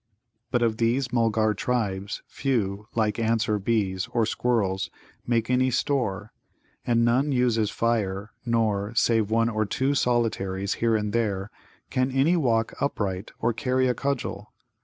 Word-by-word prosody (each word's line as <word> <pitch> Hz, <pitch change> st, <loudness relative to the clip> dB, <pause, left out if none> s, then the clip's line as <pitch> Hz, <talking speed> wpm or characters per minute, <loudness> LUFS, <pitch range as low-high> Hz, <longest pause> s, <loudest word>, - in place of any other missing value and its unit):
But 120 Hz, -1 st, +1 dB
of 110 Hz, -2 st, +1 dB
these 120 Hz, +2 st, 0 dB
Mulgar 110 Hz, -2 st, +2 dB
tribes 100 Hz, -3 st, -2 dB
few, 105 Hz, -6 st, -2 dB
like 110 Hz, -1 st, +1 dB
ants, 115 Hz, 0 st, +1 dB
or 105 Hz, -1 st, +1 dB
bees, 95 Hz, -3 st, 0 dB
or 115 Hz, -2 st, +2 dB
squirrels, 105 Hz, -5 st, 0 dB, 0.4 s
make 115 Hz, -2 st, +1 dB
any 130 Hz, +1 st, +2 dB
store, 120 Hz, -5 st, -1 dB, 0.5 s
and 115 Hz, -1 st, +3 dB
none 130 Hz, +5 st, +2 dB
uses 120 Hz, -5 st, +2 dB
fire, 105 Hz, -3 st, -1 dB
nor, 110 Hz, -2 st, 0 dB
save 115 Hz, -3 st, +2 dB
one 115 Hz, +1 st, +2 dB
or 110 Hz, -2 st, 0 dB
two 130 Hz, +6 st, 0 dB
solitaries 100 Hz, -7 st, 0 dB
here 115 Hz, -1 st, +3 dB
and 105 Hz, -1 st, -1 dB
there, 105 Hz, -4 st, -1 dB, 0.4 s
can 130 Hz, +1 st, +1 dB
any 135 Hz, +6 st, +3 dB
walk 115 Hz, -8 st, +1 dB
upright 100 Hz, -8 st, -2 dB
or 115 Hz, +1 st, +2 dB
carry 130 Hz, +1 st, +1 dB
a 125 Hz, -, +2 dB
cudgel. 120 Hz, -6 st, -3 dB
115 Hz, 145 wpm, -26 LUFS, 105-125 Hz, 0.5 s, and